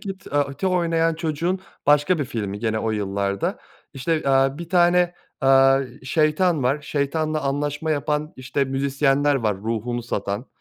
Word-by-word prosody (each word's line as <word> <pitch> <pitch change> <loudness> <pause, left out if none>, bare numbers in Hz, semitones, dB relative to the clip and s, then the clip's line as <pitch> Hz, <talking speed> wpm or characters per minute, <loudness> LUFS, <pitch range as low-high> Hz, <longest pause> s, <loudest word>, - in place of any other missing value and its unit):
Kid 195 -2 -6
aaa, 145 -1 0
te 190 - -2
oynayan 165 -2 +1
çocuğun 165 +3 -2 0.3
başka 150 +4 +4
bir 145 - 0
filmi 105 -6 -4
gene 110 0 -1
o 110 - -1
yıllarda. 100 -1 -2 0.4
İşte, 155 +4 -1
aaa, 135 +1 +3
bir 170 -1 -7
tane, 175 0 +3 0.3
aaa, 135 0 +5 0.2
şeytan 155 +3 +1
var. 135 +4 +1
Şeytanla 155 +2 -1
anlaşma 145 +3 -2
yapan, 150 +1 -1
işte, 130 +2 -1
müzisyenler 140 +1 +1
var 110 -7 0
ruhunu 115 +3 -3
satan. 100 0 -3
140 Hz, 145 wpm, -23 LUFS, 125-160 Hz, 0.4 s, aaa